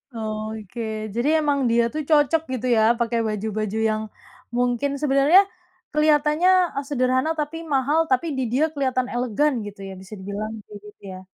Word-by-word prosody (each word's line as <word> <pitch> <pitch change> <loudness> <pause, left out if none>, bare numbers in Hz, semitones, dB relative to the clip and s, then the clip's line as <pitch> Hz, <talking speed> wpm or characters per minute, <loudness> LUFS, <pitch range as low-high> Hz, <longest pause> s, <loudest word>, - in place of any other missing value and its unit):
Oke, 215 0 -5 0.3
jadi 240 +4 0
emang 290 -2 +1
dia 235 0 +3
tuh 310 - -2
cocok 305 +1 +4
gitu 255 0 -3
ya 220 - +3 0.2
pakai 235 0 0
baju-baju 215 0 -3
yang 215 0 -1 0.6
mungkin 245 +3 0
sebenarnya 290 +6 +5 0.5
kelihatannya 300 +3 +3 0.4
sederhana 260 +1 +1
tapi 300 +2 -3 0.2
mahal. 280 +4 +2
Tapi 260 +6 +2
di 260 - 0
dia 285 +5 +3
kelihatan 260 -3 0
elegan 250 +4 +1
gitu 205 -1 -10
ya, 195 - -7
bisa 190 +3 -12
dibilang 205 +3 -5
kayak 205 -1 -11
gitu 210 - -16
ya. 185 - -8
250 Hz, 155 wpm, -23 LUFS, 215-295 Hz, 0.6 s, sebenarnya